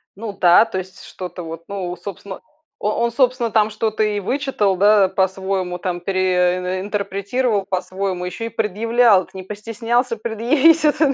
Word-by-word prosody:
Ну 210 Hz, +1 st, -6 dB
да, 180 Hz, +3 st, +6 dB
то 225 Hz, -4 st, -4 dB
есть 185 Hz, 0 st, -10 dB
что-то 180 Hz, -1 st, -8 dB
вот, 165 Hz, 0 st, -8 dB
ну 185 Hz, -3 st, -4 dB
собственно, 190 Hz, +1 st, -8 dB, 0.4 s
о 210 Hz, -, 0 dB
он 235 Hz, -, +1 dB
собственно 245 Hz, -2 st, +1 dB
там 215 Hz, 0 st, +3 dB
что-то 220 Hz, 0 st, -2 dB
и 210 Hz, -1 st, 0 dB
вычитал, 230 Hz, -3 st, 0 dB
да, 200 Hz, +1 st, +5 dB
по-своему, 190 Hz, -1 st, -1 dB
там 180 Hz, 0 st, -3 dB
пере 185 Hz, -1 st, 0 dB
и -, -, -4 dB
интерпретировал 200 Hz, +2 st, -1 dB
по-своему, 185 Hz, -1 st, -3 dB
ещё 180 Hz, +5 st, -5 dB
и -, -, -4 dB
предъявлял. 225 Hz, -1 st, +2 dB
Так -, -, -25 dB
не 190 Hz, -, -6 dB
постеснялся 230 Hz, +4 st, -2 dB
предъявить 255 Hz, +9 st, +3 dB
это. 300 Hz, -1 st, +3 dB
200 Hz, 160 wpm, -20 LUFS, 185-230 Hz, 0.4 s, да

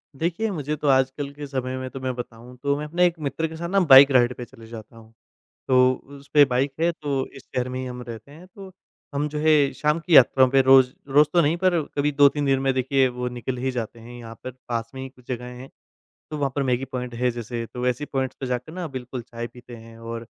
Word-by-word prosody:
देखिए, 175 Hz, +9 st, -1 dB
मुझे 150 Hz, -4 st, -3 dB
तो 150 Hz, -1 st, -4 dB
आजकल 135 Hz, +1 st, +1 dB
के 145 Hz, 0 st, -8 dB
समय 130 Hz, -1 st, -3 dB
में 130 Hz, 0 st, -5 dB
तो 135 Hz, -, -8 dB
मैं 130 Hz, -1 st, -3 dB
बताऊँ, 120 Hz, 0 st, -9 dB
तो 140 Hz, 0 st, +1 dB
मैं 150 Hz, -, -4 dB
अपने 175 Hz, +4 st, +2 dB
एक 175 Hz, -1 st, +1 dB
मित्र 155 Hz, +2 st, -2 dB
के 160 Hz, -, -9 dB
साथ 170 Hz, +1 st, -5 dB
ना 195 Hz, +2 st, +3 dB
बाइक 135 Hz, +1 st, +10 dB
राइड 125 Hz, -1 st, +4 dB
पे 125 Hz, -, -6 dB
चले 115 Hz, -1 st, -15 dB
जाता 115 Hz, 0 st, -11 dB
हूँ। 110 Hz, 0 st, -17 dB, 0.5 s
तो 130 Hz, -1 st, +5 dB
उ 140 Hz, +2 st, -12 dB
उसपे 140 Hz, +1 st, +3 dB
बाइक 135 Hz, +1 st, 0 dB
है 170 Hz, +1 st, +2 dB
तो, 140 Hz, -5 st, -3 dB
इस 135 Hz, -, -14 dB
शहर 125 Hz, 0 st, -3 dB
में 130 Hz, 0 st, -4 dB
ही 130 Hz, -, -4 dB
हम 125 Hz, -1 st, -7 dB
रहते 115 Hz, +4 st, -9 dB
हैं 170 Hz, +5 st, -14 dB
तो 195 Hz, -2 st, -10 dB, 0.4 s
हम 145 Hz, +1 st, -1 dB
जो 150 Hz, -, -5 dB
है 150 Hz, -2 st, +4 dB
शाम 150 Hz, +2 st, 0 dB
की 170 Hz, -1 st, +1 dB
यात्रा 130 Hz, 0 st, +7 dB
पे 135 Hz, +1 st, +4 dB
रोज़ 130 Hz, -1 st, +6 dB, 0.2 s
रोज़ 145 Hz, +2 st, +5 dB
तो 175 Hz, -, +5 dB
नहीं 160 Hz, +2 st, +1 dB
पर 175 Hz, -2 st, +2 dB, 0.2 s
कभी 145 Hz, +1 st, +2 dB
2-3 145 Hz, 0 st, +3 dB
दिन 135 Hz, -1 st, +2 dB
में 135 Hz, 0 st, +1 dB
देखिए 130 Hz, +1 st, +2 dB
वो 125 Hz, 0 st, -4 dB
निकल 125 Hz, +1 st, -5 dB
ही 130 Hz, +2 st, -2 dB
जाते 120 Hz, -2 st, -5 dB
हैं, 120 Hz, +2 st, -11 dB
यहाँ 115 Hz, -1 st, -10 dB
पर 130 Hz, -, -5 dB, 0.2 s
पास 115 Hz, -1 st, -3 dB
में 130 Hz, -, -6 dB
ही 135 Hz, -, -5 dB
कुछ 125 Hz, -2 st, -23 dB
जगहें 125 Hz, 0 st, -6 dB
हैं। 130 Hz, +2 st, -10 dB, 0.6 s
तो 150 Hz, -, -3 dB
वहाँ 140 Hz, -1 st, 0 dB
पर 140 Hz, -, 0 dB
मैगी 130 Hz, 0 st, 0 dB
पॉइंट 125 Hz, -2 st, -6 dB
है 125 Hz, +1 st, +1 dB
जैसे 115 Hz, 0 st, -5 dB
तो 125 Hz, -, -5 dB
वैसी 125 Hz, +3 st, -1 dB
पॉइंट्स 130 Hz, -2 st, -3 dB
पे 135 Hz, -, -4 dB
जाके 125 Hz, +4 st, -3 dB
न 180 Hz, -3 st, -4 dB
बिल्कुल 130 Hz, -1 st, -6 dB
चाय 120 Hz, 0 st, -7 dB
पीते 120 Hz, 0 st, -13 dB
हैं 115 Hz, 0 st, -13 dB
और 115 Hz, 0 st, -7 dB
130 Hz, 255 wpm, -24 LUFS, 125-145 Hz, 0.6 s, बाइक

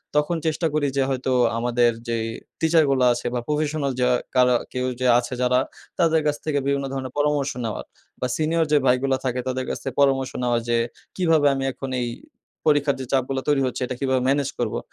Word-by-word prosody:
তখন 150 Hz, +3 st, +2 dB
চেষ্টা 160 Hz, +1 st, +1 dB
করি 150 Hz, -2 st, +1 dB
যে 135 Hz, -, +4 dB
হয়তো 130 Hz, 0 st, -1 dB, 0.3 s
আমাদের 120 Hz, 0 st, +2 dB, 0.2 s
যে 115 Hz, -, 0 dB, 0.4 s
টিচারগুলা 150 Hz, -6 st, +3 dB
আছে 120 Hz, -, -6 dB
বা 125 Hz, -, 0 dB
professional 150 Hz, -1 st, 0 dB
যা 125 Hz, -, +3 dB, 0.3 s
কারা 125 Hz, -1 st, +5 dB, 0.2 s
কেউ 125 Hz, 0 st, -1 dB
যে 130 Hz, -, +1 dB
আছে 125 Hz, +1 st, -5 dB
যারা, 125 Hz, 0 st, +3 dB, 0.4 s
তাদের 165 Hz, -2 st, +3 dB
কাছ 150 Hz, -1 st, +2 dB
থেকে 145 Hz, -2 st, +1 dB
বিভিন্ন 140 Hz, 0 st, 0 dB
ধরনের 130 Hz, -1 st, -4 dB
পরামর্শ 145 Hz, -1 st, +1 dB
নেওয়ার 110 Hz, -, -4 dB, 0.4 s
বা 125 Hz, -, +1 dB
সিনিয়র 160 Hz, +1 st, +1 dB
যে 150 Hz, -, +6 dB
ভাইগুলা 130 Hz, +1 st, +2 dB
থাকে 125 Hz, -1 st, -1 dB
তাদের 130 Hz, 0 st, -2 dB
কাছ -, -, -2 dB
থেকে 135 Hz, -2 st, -4 dB
পরামর্শ 135 Hz, -2 st, +2 dB
নেওয়া 120 Hz, -1 st, +2 dB
যে, 120 Hz, 0 st, +2 dB, 0.4 s
"কীভাবে 165 Hz, -5 st, +3 dB
আমি 135 Hz, 0 st, -2 dB
এখন 135 Hz, +2 st, -7 dB
এই 120 Hz, -, -1 dB, 0.6 s
পরীক্ষার 145 Hz, -2 st, +3 dB
যে 130 Hz, -, -4 dB
চাপগুলা 135 Hz, 0 st, 0 dB
তৈরি 145 Hz, -2 st, +3 dB
হচ্ছে 130 Hz, 0 st, -3 dB
এটা 125 Hz, -, -4 dB
কিভাবে 130 Hz, -2 st, +1 dB
ম্যানেজ 140 Hz, 0 st, +1 dB
করবো?" -, -, -1 dB
135 Hz, 195 wpm, -23 LUFS, 125-150 Hz, 0.6 s, যে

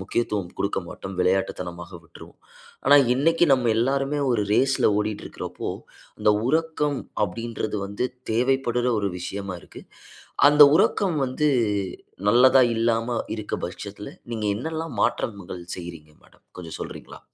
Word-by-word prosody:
முக்கியத்துவம் 100 Hz, -2 st, -2 dB
கொடுக்க 100 Hz, -, 0 dB
மாட்டோம். 95 Hz, -1 st, -8 dB
விளையாட்டுத்தனமாக 90 Hz, -2 st, -1 dB
விட்டுருவோம். -, -, -15 dB, 0.5 s
ஆனா, 145 Hz, +1 st, +8 dB, 0.2 s
இன்னக்கி 165 Hz, +6 st, +3 dB
நம்ம 125 Hz, -3 st, +3 dB
எல்லாருமே 135 Hz, +4 st, 0 dB
ஒரு 110 Hz, -4 st, +1 dB
ரேஸ்ல 135 Hz, -1 st, +3 dB
ஓடிட்டு 105 Hz, 0 st, -3 dB
இருக்கிறப்போ, -, -, -6 dB, 0.5 s
இந்த 105 Hz, -, +4 dB, 0.2 s
உறக்கம் 155 Hz, -2 st, 0 dB, 0.3 s
அப்பிடின்றது 110 Hz, +2 st, -4 dB
வந்து 100 Hz, +5 st, -2 dB, 0.2 s
தேவைப்படுற 125 Hz, +1 st, +1 dB
ஒரு 100 Hz, -1 st, -1 dB
விஷயமா 95 Hz, +1 st, -5 dB
இருக்கு. -, -, -13 dB, 0.7 s
அந்த 150 Hz, 0 st, +7 dB
உறக்கம் 185 Hz, -1 st, +2 dB
வந்து 130 Hz, +4 st, -1 dB, 0.8 s
நல்லதா 130 Hz, +4 st, +6 dB
இல்லாம 115 Hz, +1 st, 0 dB, 0.2 s
இருக்க 105 Hz, -1 st, -4 dB
பட்சத்தில, -, -, -8 dB, 0.2 s
நீங்க 110 Hz, -2 st, -2 dB
என்னெல்லாம் 160 Hz, +6 st, -4 dB
மாற்றங்கள் 95 Hz, -4 st, -2 dB
செய்றீங்க 85 Hz, -4 st, -9 dB
மேடம்? -, -, -25 dB
கொஞ்சம் 85 Hz, -3 st, -8 dB
சொல்றீங்களா? -, -, -8 dB
115 Hz, 120 wpm, -24 LUFS, 100-135 Hz, 0.8 s, ஆனா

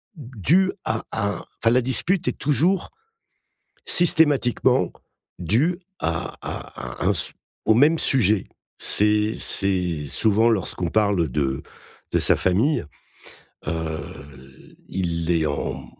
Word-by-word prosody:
dû 150 Hz, -, +1 dB
à 110 Hz, 0 st, -2 dB
à 100 Hz, -4 st, -2 dB, 0.2 s
enfin, 115 Hz, -, +4 dB
la 125 Hz, +1 st, +3 dB
dispute 170 Hz, +8 st, 0 dB
est -, -, +1 dB
toujours 160 Hz, +7 st, +1 dB, 1.0 s
systématiquement 150 Hz, -8 st, +3 dB, 0.5 s
due 130 Hz, -, +1 dB, 0.2 s
à 80 Hz, -1 st, -3 dB
à -, -, -7 dB
à -, -, +1 dB
un -, -, +3 dB, 0.5 s
au 110 Hz, -, +5 dB
même 150 Hz, +7 st, +4 dB
sujet. 110 Hz, -6 st, +2 dB, 0.3 s
C'est 105 Hz, +1 st, +2 dB
c'est 90 Hz, -6 st, 0 dB
souvent 110 Hz, +8 st, +2 dB
lorsqu'on 95 Hz, -4 st, -1 dB
parle 100 Hz, -6 st, +1 dB
de 65 Hz, +1 st, -2 dB, 0.5 s
de -, -, +3 dB
sa -, -, +3 dB
famille, 105 Hz, -, +1 dB, 0.8 s
heu, 80 Hz, -1 st, -3 dB, 0.9 s
il 85 Hz, -2 st, -2 dB
est 80 Hz, -2 st, +1 dB
en 65 Hz, -2 st, -4 dB
105 Hz, 115 wpm, -22 LUFS, 85-135 Hz, 1.0 s, au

